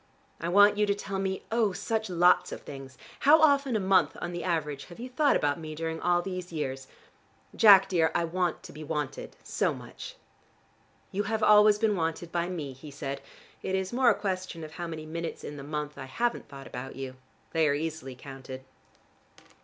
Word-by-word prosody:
I 170 - -2
want 205 +3 +6
you 210 - +3
to 200 - +2
tell 195 -1 -4
me, 190 0 -2
oh, 225 -4 +2
such 220 +2 -2
lots 175 0 +4
of - - -6
things. 135 -2 -10 0.2
How 305 +3 +6
often 280 -5 +4
a - - +2
month 185 -5 +3
on 175 - -4
the 175 0 -4
average 150 -5 -2
have 175 - -13
you 245 - -5
thought 285 +3 +3
about 145 +2 +1
me 155 -1 -7
during 160 +1 -4
all 175 0 +2
these 185 -1 -5
years? 135 -4 -4 0.7
Jack, 195 -3 +8
dear, 170 -4 +2
I - - +2
want 175 +1 -1
to - - -11
be 155 +1 -8
wanted, 150 -2 -4
so - - 0
much." - - -10 1.0
"You 195 - -1
have 220 -1 -1
always 210 0 +7
been 215 -1 +2
wanted 165 0 -2
by 175 0 -1
me," 155 -7 -4
he 135 +4 -11
said. 140 -1 -5 0.4
"It 190 - -1
is 190 +3 -2
more 250 0 +5
a 220 - +4
question 185 -4 -4
of 155 - -8
how 170 +1 -5
many 160 -2 -6
minutes 165 +1 -5
in 150 - -6
the 140 - -8
month 150 0 -4
I 135 - -6
haven't 235 - -2
thought 135 -1 -10
about 135 +2 -7
you. 130 -1 -6 0.3
They 160 -2 +3
are 145 - +2
easily 155 -4 -4
counted." 130 0 -9
170 Hz, 200 wpm, -28 LUFS, 150-200 Hz, 1.0 s, Jack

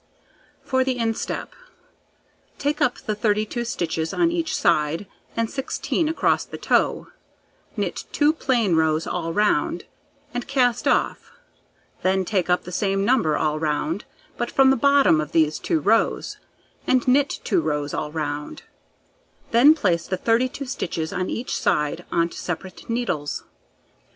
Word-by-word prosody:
For 260 -1 +1
the 260 -1 -1
instep: 225 -1 -2 1.0
Take 290 +1 -1
up 245 - +2
the 215 - -3
32 215 +2 0
stitches 165 -7 -2
on 340 -1 +3
each 335 -2 -1
side, 165 +3 +1 0.3
and 230 0 +1
16 280 +5 -2
across 325 - +1
the - - -9
toe, - - +1 0.7
knit - - -3
2 295 +1 +3
plain 240 - +1
rows 160 0 +2
all 165 -2 -3
round, 210 +5 +1 0.5
and 245 0 -4
cast 250 -3 +1
off; - - 0 0.7
then 190 0 +1
take 185 -2 0
up 180 - +2
the 180 - -8
same 195 +1 0
number 205 -11 +2
all 155 -1 0
round, 155 +4 -1 0.3
but 240 - -2
from 265 -1 +5
the - - +4
bottom 275 - +4
of 150 +1 -7
these 155 -2 +2
2 160 - 0
rows, 220 +9 +1 0.5
and 255 -1 +2
knit 280 +3 +3
2 360 - +1
rows 150 - -2
all 150 - -3
round; 150 -2 -4 0.9
then 260 +7 +7
place 180 - 0
the 185 - -1
32 250 +7 0
stitches 165 -10 -3
on 185 0 -2
each 240 - -3
side 150 +4 0
on 170 0 +2
to - - -11
separate 185 +4 -6
needles. 180 -12 -2
205 Hz, 145 wpm, -23 LUFS, 165-255 Hz, 1.0 s, then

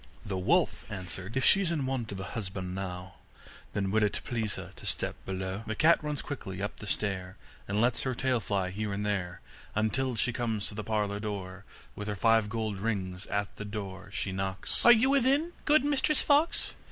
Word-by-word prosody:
The 100 - -3
wolf 90 - +2
answered: 95 +2 -5
'If 130 - +2
she's 195 -3 +6
in 150 -5 0
want 130 -5 -2
of 95 - -5
a - - -3
husband 95 -4 -4
now, 95 0 -5 0.6
Then 95 -1 0
will 110 +2 +3
it 105 -1 +1
please 110 -4 -2
her - - -7
to - - -10
step - - -1
below?' 95 +1 -3
The 110 - -2
cat 160 +5 +5
runs 150 -2 -2
quickly 100 -10 -5
up 105 +1 -3
the 110 - -8
stair, 95 -3 -2 0.3
And 100 +1 0
lets 120 +1 +3
her 130 -2 -1
tail 125 0 +1
fly 95 -4 -1
here 105 +2 -3
and 105 +1 -2
there, 95 -4 -2 0.3
Until 115 +4 +1
she 120 +2 +1
comes 115 -4 -1
to - - -8
the 105 +1 -4
parlour 105 -1 0
door. 100 -2 -5 0.3
With 105 - -5
her 105 - -1
five 115 +1 +4
gold 110 -2 -2
rings 95 -4 -2
at 100 0 -2
the 105 - -5
door 100 -2 -6
she 100 - -1
knocks: 95 0 -2
'Are 240 - +10
you 240 +3 +6
within, 280 +5 +3
good 305 -1 +5
Mistress 290 +1 +3
Fox? 295 +3 +3
105 Hz, 200 wpm, -30 LUFS, 95-125 Hz, 0.6 s, Are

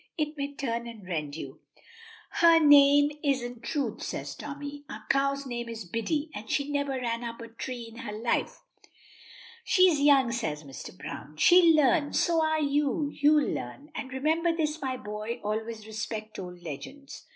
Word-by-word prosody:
It 305 -1 -1
may 280 -1 -3
turn 235 -3 -3
and 220 -5 -10
rend 150 -5 -3
you." 160 - -8 0.7
"Her 335 -1 +6
name 290 -1 +7
isn't 245 -4 -1
Truth," 280 +4 -2
says - - -4
Tommy. 285 0 -7
"Our 215 0 -8
cow's 275 0 +1
name 240 -2 -4
is 225 -3 -6
Biddy, 285 - -2
and 210 +1 -8
she 285 0 0
never 285 -1 0
ran 240 -2 -2
up 230 -1 -6
a 230 -1 -8
tree 240 +1 -6
in 225 0 -13
her 235 -4 -6
life." 225 +3 -1 1.0
"She's 365 -9 +4
young," 275 -4 +5
says 160 -11 -3
Mr. 135 -3 -10
Browne. 155 - -8
"She'll 340 - +7
learn. 300 0 +3
So 330 -2 +2
are 315 0 +1
you 290 +1 0
you'll 295 0 +3
learn. 280 - -7
And 260 - -6
remember 315 +6 +1
this, 310 -1 -1
my 260 -2 -2
boy, 215 +1 -5
always 220 +1 -3
respect 215 0 -5
old 180 -2 -8
legends. 170 - -9
265 Hz, 165 wpm, -28 LUFS, 220-290 Hz, 1.0 s, name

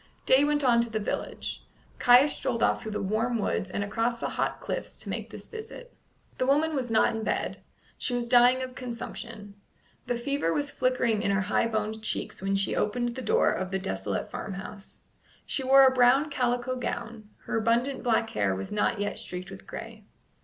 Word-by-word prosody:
Day 265 +2 +6
went 295 0 +2
on 240 -3 +5
to 235 - -2
the 220 - -2
village. 210 - -4 0.4
Caius 250 +4 +6
strolled 235 -3 -1
off - - +2
through 220 - -5
the - - -2
warm 225 +4 0
woods 195 -3 -1
and 200 - -2
across 230 +3 -1
the - - -2
hot - - -2
cliffs - - -5
to - - -7
make - - -4
this - - -10
visit. 470 +2 -9 0.5
The 255 - +1
woman 305 +3 +3
was 260 -4 -2
not 225 0 +3
in 225 - -3
bed. - - -2 0.4
She 250 - -1
was 240 -1 -1
dying 245 +1 +5
of 255 0 -6
consumption. 230 -4 -7 0.5
The 245 - 0
fever 260 -7 -1
was 285 +8 0
flickering 250 -4 +1
in 210 - 0
her 200 +1 +2
high 200 +4 +1
boned 220 0 -2
cheeks 220 - -3
when 195 +1 0
she 195 0 +1
opened 240 +3 0
the 260 - -6
door - - +3
of 185 0 -2
the 190 - -1
desolate 95 - -3
farmhouse. 195 +1 -7 0.4
She 270 - -1
wore 270 +1 +7
a 260 - +5
brown 260 +4 +4
calico 245 -1 0
gown; 230 -3 -5 0.2
her - - -3
abundant 235 +4 +1
black 225 -1 +1
hair 100 -2 +1
was 95 +1 -6
not 210 +1 0
yet 205 0 -2
streaked 180 +1 -7
with 195 - -11
gray. 225 -2 -8
235 Hz, 195 wpm, -28 LUFS, 210-255 Hz, 0.5 s, wore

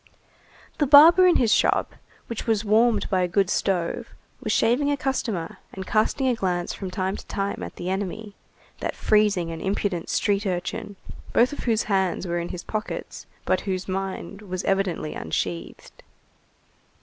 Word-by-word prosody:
The 295 - +2
barber 330 +7 +8
in 355 - +5
his 225 -4 +3
shop, - - +2 0.3
which 230 -1 -6
was 220 -1 +1
warmed 220 +1 +3
by 185 -1 +2
a 180 - +1
good 190 +1 +1
stove, 195 +5 -1 0.3
was 215 - -2
shaving 245 +7 +2
a 285 - +1
customer 230 -11 -3
and 190 0 -6
casting 225 +7 +1
a 255 - +3
glance 180 -5 -1
from 190 - -6
time 190 +1 -2
to - - -11
time 200 -1 -3
at - - -7
the 175 - -6
enemy, 205 +2 -4 0.5
that - - -3
freezing 205 -6 +2
and 165 -1 -6
impudent 190 -3 -2
street 205 0 +1
urchin 195 +3 -3 0.4
both 250 +5 +4
of - - -7
whose 225 -2 +2
hands 190 -3 0
were 175 -1 -1
in 170 - -4
his 175 - -6
pockets, 215 0 -5 0.2
but - - +1
whose 190 -1 -3
mind 195 0 -4
was 185 -2 -5
evidently 195 -5 -1
unsheathed. 85 +1 -5
200 Hz, 165 wpm, -24 LUFS, 180-225 Hz, 0.5 s, barber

